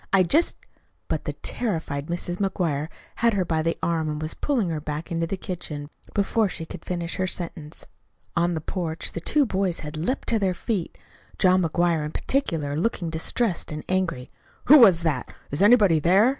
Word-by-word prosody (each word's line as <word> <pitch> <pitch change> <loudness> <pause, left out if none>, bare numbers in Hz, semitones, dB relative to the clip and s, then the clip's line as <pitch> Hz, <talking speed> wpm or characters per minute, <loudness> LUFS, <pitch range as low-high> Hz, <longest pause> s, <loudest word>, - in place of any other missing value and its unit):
"I 195 -1 +5
just 305 - +3 0.3
" - - -43
But - - -2
the - - -2
terrified 160 -10 -2
Mrs. 175 +1 -3
McGuire 170 -7 -1 0.3
had 230 -1 +3
her 190 -2 +1
by 160 -2 0
the 165 +1 0
arm 160 -2 0
and 150 0 -3
was 155 +1 -3
pulling 245 -11 0
her 155 -2 -3
back 150 +2 -5
into 165 0 0
the 195 - -3
kitchen 150 -6 -6 0.2
before 205 +1 +2
she 165 - -5
could - - -9
finish 175 -1 -3
her 185 - 0
sentence. 165 -4 -4 0.5
On 175 0 +2
the 160 - -3
porch 165 -1 -3
the - - -4
two 290 - +3
boys 190 -5 -1
had 150 0 -6
leaped 180 - -2
to 225 - +3
their 190 -3 +1
feet, 195 -3 -3 0.4
John 185 0 +4
McGuire, 170 -1 +1
in 150 - -5
particular, 160 - 0
looking 175 -1 -1
distressed 175 +4 -1
and 150 0 -5
angry. 175 -9 -1 0.3
"Who 295 +2 +9
was 185 -8 +7
that? 145 -7 -1 0.2
Is 145 - -1
anybody 205 -6 +6
there?" 190 +9 +5
175 Hz, 190 wpm, -25 LUFS, 160-195 Hz, 0.5 s, Who